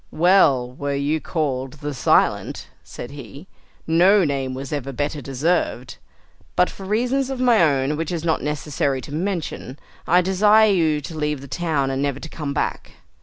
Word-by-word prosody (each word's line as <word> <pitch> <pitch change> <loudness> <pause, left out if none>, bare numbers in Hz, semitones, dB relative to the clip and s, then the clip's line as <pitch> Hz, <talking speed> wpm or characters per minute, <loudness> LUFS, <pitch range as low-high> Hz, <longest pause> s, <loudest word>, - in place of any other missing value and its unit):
"Well 155 -8 +3
were 140 +2 -3
you 145 +3 -1
called 135 -4 -3
`the 145 0 -5
Silent,'" 125 - +1
said 120 - -9
he; 140 - -10 0.4
"no 180 +4 +4
name 135 -3 -2
was 135 +2 -6
ever 140 -2 -3
better 145 +2 -3
deserved. 135 -1 -1 0.6
But 180 0 +3
for 195 - -10
reasons 250 +6 0
of 265 -2 -4
my 245 -5 +4
own, 140 -2 +2
which 165 +2 -3
it - - -1
is 165 - -5
not 160 - +1
necessary 145 -2 -2
to 135 +3 -9
mention, 165 -6 -4 0.3
I 180 +2 +5
desire 210 +4 +4
you 160 -5 +2
to 160 +4 -8
leave 150 -2 -2
the 140 - -10
town, 145 -3 -1
and 135 0 -2
never 140 -2 -1
to 160 - -8
come 150 -3 -5
back." - - -3
150 Hz, 175 wpm, -22 LUFS, 140-180 Hz, 0.6 s, I